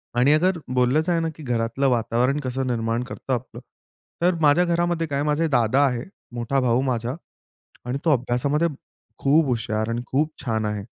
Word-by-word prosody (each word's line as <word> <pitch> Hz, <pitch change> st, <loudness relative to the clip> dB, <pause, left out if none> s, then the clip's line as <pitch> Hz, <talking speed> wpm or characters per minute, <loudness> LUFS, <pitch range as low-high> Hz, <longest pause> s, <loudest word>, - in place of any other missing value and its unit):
आणि 130 Hz, +5 st, +4 dB
अगर 180 Hz, +3 st, +2 dB, 0.2 s
बोललंच 130 Hz, +7 st, +2 dB
आहे 170 Hz, -1 st, +2 dB
ना 165 Hz, 0 st, -1 dB
की 155 Hz, -, -11 dB
घरातलं 120 Hz, +2 st, 0 dB
वातावरण 125 Hz, +4 st, +1 dB
कसं 130 Hz, -1 st, -3 dB
निर्माण 115 Hz, 0 st, -1 dB
करतं 130 Hz, +1 st, -5 dB
आपलं. 125 Hz, 0 st, -4 dB, 0.6 s
तर 175 Hz, 0 st, +3 dB
माझ्या 155 Hz, +4 st, +5 dB
घरामध्ये 170 Hz, -1 st, 0 dB
काय 140 Hz, 0 st, -1 dB
माझे 150 Hz, +2 st, +1 dB
दादा 130 Hz, -1 st, +2 dB
आहे, 125 Hz, -2 st, -1 dB, 0.3 s
मोठा 120 Hz, +3 st, -1 dB
भाऊ 125 Hz, 0 st, +2 dB
माझा 125 Hz, 0 st, -1 dB, 0.7 s
आणि 125 Hz, +2 st, -2 dB
तो 160 Hz, -, +4 dB
अभ्यासामध्ये 135 Hz, +6 st, +1 dB, 0.5 s
खूप 150 Hz, +3 st, +4 dB
हुशार 110 Hz, -3 st, -1 dB
आणि 115 Hz, +1 st, -2 dB
खूप 150 Hz, +4 st, 0 dB
छान 110 Hz, -2 st, 0 dB
आहे. 105 Hz, -1 st, -3 dB
130 Hz, 170 wpm, -23 LUFS, 120-150 Hz, 0.7 s, माझ्या